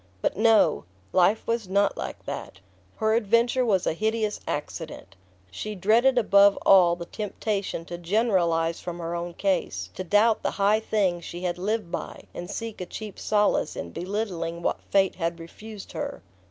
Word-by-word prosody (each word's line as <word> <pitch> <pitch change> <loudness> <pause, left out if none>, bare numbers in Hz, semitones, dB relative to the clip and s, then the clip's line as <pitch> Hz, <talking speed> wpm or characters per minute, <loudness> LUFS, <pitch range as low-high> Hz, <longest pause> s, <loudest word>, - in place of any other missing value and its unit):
But - - +1
no! 220 - +4 0.3
Life 185 +4 +3
was 230 -4 -2
not 200 +1 +2
like - - -6
that. 100 - -6 0.4
Her 220 0 +1
adventure 235 +3 +3
was 200 -6 +2
a - - +1
hideous 215 +2 -1
accident. 150 - -5 0.4
She 215 - -5
dreaded 230 +7 +3
above 200 -3 +5
all 180 -3 +6
the 170 0 -7
temptation 205 -3 -3
to 175 0 -7
generalise 175 -4 +1
from 175 -1 -6
her 170 0 -4
own 170 0 -4
case, 195 -1 -1
to 185 - -5
doubt 210 +4 +3
the - - 0
high 205 +2 +3
things 195 -6 0
she 175 +1 -7
had 180 -1 -2
lived 210 -1 -2
by - - -5
and 175 +1 -7
seek 225 0 -5
a 180 - -5
cheap 215 -3 -8
solace 210 -1 +1
in 85 - -6
belittling 175 - -3
what - - -1
fate 195 -1 +3
had 170 -1 -2
refused 210 +5 -10
her. - - -5
195 Hz, 165 wpm, -26 LUFS, 175-215 Hz, 0.4 s, all